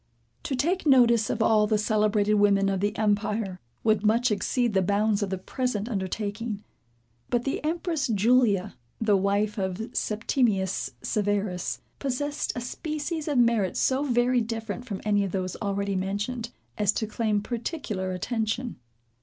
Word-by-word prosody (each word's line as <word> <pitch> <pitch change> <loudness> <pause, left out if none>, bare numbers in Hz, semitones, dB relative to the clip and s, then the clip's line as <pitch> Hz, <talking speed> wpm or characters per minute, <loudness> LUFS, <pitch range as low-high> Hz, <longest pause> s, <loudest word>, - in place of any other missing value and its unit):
To 270 - -2
take 330 +6 0
notice 235 -5 +5
of 225 - 0
all 215 -2 +4
the 215 0 +2
celebrated 210 -1 +2
women 200 -1 +4
of 195 -1 0
the 205 +3 -1
empire, 210 -2 0 0.2
would 215 -2 +2
much 230 +3 +3
exceed 235 +3 0
the 190 - +3
bounds 205 +2 +1
of 200 - -1
the 190 - -2
present 225 +1 -2
undertaking. 210 +1 -3 0.7
But 240 -1 +1
the 275 - -2
empress 325 -2 -1
Julia 215 -3 +3 0.2
the 215 -2 +3
wife 200 +2 +1
of 190 +4 -3
Septimius 210 -3 0
Severus, 205 -3 -1 0.2
possessed 290 +2 -2
a 245 - -3
species 305 +5 -4
of 290 -3 0
merit 230 -6 +3
so 265 +2 +2
very 245 -2 +2
different 225 +1 -4
from 200 -6 -5
any 205 -1 +3
of 195 - -3
those 185 -2 -2
already 200 -1 -1
mentioned, 205 +6 -2 0.3
as 205 -1 +4
to 220 - -1
claim 215 -1 0
particular 225 - -3
attention. 220 +5 -2
215 Hz, 150 wpm, -27 LUFS, 200-245 Hz, 0.7 s, notice